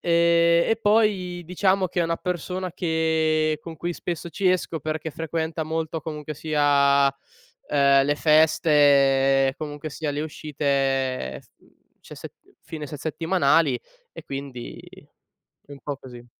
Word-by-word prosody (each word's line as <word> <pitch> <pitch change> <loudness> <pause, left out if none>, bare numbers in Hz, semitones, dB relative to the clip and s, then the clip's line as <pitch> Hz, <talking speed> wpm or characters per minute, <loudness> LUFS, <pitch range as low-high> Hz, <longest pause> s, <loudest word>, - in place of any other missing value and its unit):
ehm, 170 0 +3
e 225 - +1
poi 205 -5 +1
diciamo 185 +2 +1
che 175 - -2
è - - +3
una 165 0 -1
persona 180 +1 -4
che 160 -2 0
con 165 0 -9
cui 175 +3 -3
spesso 170 0 -5
ci 185 +4 0
esco 180 -3 0
perché 155 +1 -4
frequenta 160 0 -3
molto 160 0 -3
comunque 150 -1 -6
sia, 140 -2 +3 0.6
ehm, 140 -1 +4
le 145 +1 +1
feste, 140 -4 +4
comunque 150 0 -6
sia 150 +1 -4
le 145 - -3
uscite 135 - -2
s - - -26
mhmm - - -29 0.2
ce - - -11
se - - -9
mhmm, - - -26
fine 155 -2 -7
se 150 - -7
settimanali 160 -3 +1 0.3
e - - -10
quindi 135 -3 -7 0.9
un 140 -1 -10
po’ 145 -2 -5
così. 120 -3 -13
155 Hz, 145 wpm, -24 LUFS, 140-170 Hz, 0.9 s, ehm